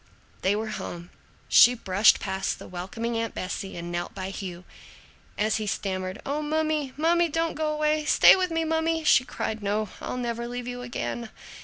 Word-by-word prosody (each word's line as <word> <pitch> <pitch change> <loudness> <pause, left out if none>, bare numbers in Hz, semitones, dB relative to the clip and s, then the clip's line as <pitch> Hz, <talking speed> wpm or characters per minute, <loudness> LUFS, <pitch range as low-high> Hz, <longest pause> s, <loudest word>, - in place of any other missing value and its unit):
They 195 +2 +2
were 220 +1 -3
home. 175 0 -7 0.4
She 245 +1 +7
brushed 200 -1 +4
past 190 0 -2
the - - -11
welcoming 190 +6 -4
Aunt 230 -1 -3
Bessie 190 +1 -4
and 170 0 -6
knelt 175 0 -4
by 190 0 -4
Hugh. 185 -3 -7 0.7
As 215 +1 +1
he 215 -1 -4
stammered, 185 0 -3
"O 290 +2 -1
mummy, 305 -2 0
mummy, 340 +2 +3
don't 330 +2 0
go 310 0 -1
away! 305 0 +1
Stay - - +7
with 370 -1 0
me, 325 0 0
mummy!" 320 0 0
she 270 -3 +5
cried, 220 -3 -4
"No, 205 +1 -1
I'll - - -4
never 235 -1 -3
leave 245 0 -5
you 245 0 -5
again!" 240 -1 -4
235 Hz, 180 wpm, -26 LUFS, 195-305 Hz, 0.7 s, She